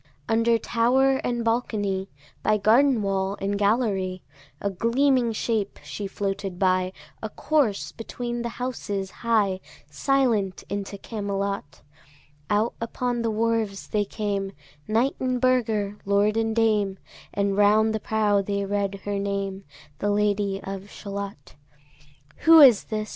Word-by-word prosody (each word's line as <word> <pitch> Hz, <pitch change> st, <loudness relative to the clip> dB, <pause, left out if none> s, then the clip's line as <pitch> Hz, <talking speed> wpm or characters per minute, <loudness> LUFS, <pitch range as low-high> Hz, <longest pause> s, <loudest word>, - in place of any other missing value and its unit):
Under 230 Hz, +1 st, +3 dB
tower 260 Hz, +4 st, +2 dB
and 240 Hz, -3 st, -2 dB
balcony, 205 Hz, -5 st, -1 dB, 0.3 s
By 215 Hz, 0 st, +2 dB
garden 230 Hz, +3 st, +4 dB
wall 195 Hz, 0 st, -1 dB
and 200 Hz, +1 st, -1 dB
gallery, 200 Hz, -3 st, 0 dB, 0.4 s
A 200 Hz, -, -1 dB
gleaming 240 Hz, +4 st, +2 dB
shape 215 Hz, -2 st, -1 dB
she 205 Hz, -, -5 dB
floated 195 Hz, -2 st, -3 dB
by, 185 Hz, -1 st, +2 dB, 0.3 s
A 220 Hz, -, -4 dB
corse 270 Hz, -7 st, 0 dB
between 240 Hz, +1 st, -5 dB
the 235 Hz, -, -2 dB
houses 205 Hz, -6 st, -3 dB
high, 210 Hz, -5 st, +1 dB, 0.3 s
Silent 225 Hz, -, +1 dB
into 200 Hz, 0 st, -4 dB
Camelot. 200 Hz, -6 st, -4 dB, 0.7 s
Out 210 Hz, +3 st, +2 dB
upon 240 Hz, +1 st, -2 dB
the 230 Hz, -, 0 dB
wharfs 220 Hz, -2 st, 0 dB
they 210 Hz, -1 st, 0 dB
came, 200 Hz, -1 st, -3 dB, 0.3 s
Knight 235 Hz, +6 st, +1 dB
and 255 Hz, -1 st, 0 dB
burgher, 220 Hz, -5 st, +1 dB
lord 200 Hz, +2 st, +2 dB
and 225 Hz, 0 st, 0 dB
dame, 210 Hz, -4 st, +2 dB, 0.3 s
And 200 Hz, -1 st, 0 dB
round 215 Hz, +2 st, +4 dB
the 220 Hz, -, -1 dB
prow 210 Hz, -2 st, +1 dB
they 200 Hz, 0 st, -2 dB
read 200 Hz, -1 st, -2 dB
her 205 Hz, -1 st, -1 dB
name, 200 Hz, -1 st, -3 dB, 0.3 s
The 205 Hz, -, 0 dB
Lady 205 Hz, -1 st, +1 dB
of 195 Hz, +1 st, -6 dB
Shalott. 200 Hz, -8 st, -7 dB, 0.8 s
Who 325 Hz, 0 st, +7 dB
is 255 Hz, -8 st, +8 dB
this? 215 Hz, -1 st, -3 dB
210 Hz, 130 wpm, -25 LUFS, 200-230 Hz, 0.8 s, is